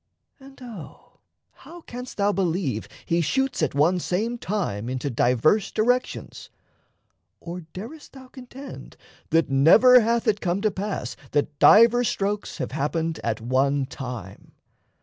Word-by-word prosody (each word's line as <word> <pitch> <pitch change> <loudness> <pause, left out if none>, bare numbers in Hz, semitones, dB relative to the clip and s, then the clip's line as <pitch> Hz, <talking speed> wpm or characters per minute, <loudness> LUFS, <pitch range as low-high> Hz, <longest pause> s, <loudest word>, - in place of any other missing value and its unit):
And 270 0 -15
O 215 -11 -12 0.3
how 345 +1 -14
Canst 250 -3 -9
thou 200 0 +2
believe 170 - -1 0.2
he 170 +1 +1
shoots 265 - -1
at 150 -3 0
one 165 +6 +3
same 220 +8 -2
time 150 - -3
Into 130 +2 -3
diverse 125 - +2
directions? 245 +3 -1 0.9
Or 175 +1 -7
darest 240 +12 -10
thou 265 -1 -13
Contend 260 +1 -11 0.3
that 165 -3 +2
never 220 - +7
hath 235 +1 0
it 210 -1 +1
come 180 +1 0
to 215 0 +1
pass 195 - -4 0.2
That 145 0 -1
divers 235 +2 +6
strokes 205 +1 -3
have - - -4
happened 160 +3 -2
at 110 -1 -2
one 135 +3 +1
time? 125 -7 -9
185 Hz, 135 wpm, -24 LUFS, 140-235 Hz, 0.9 s, never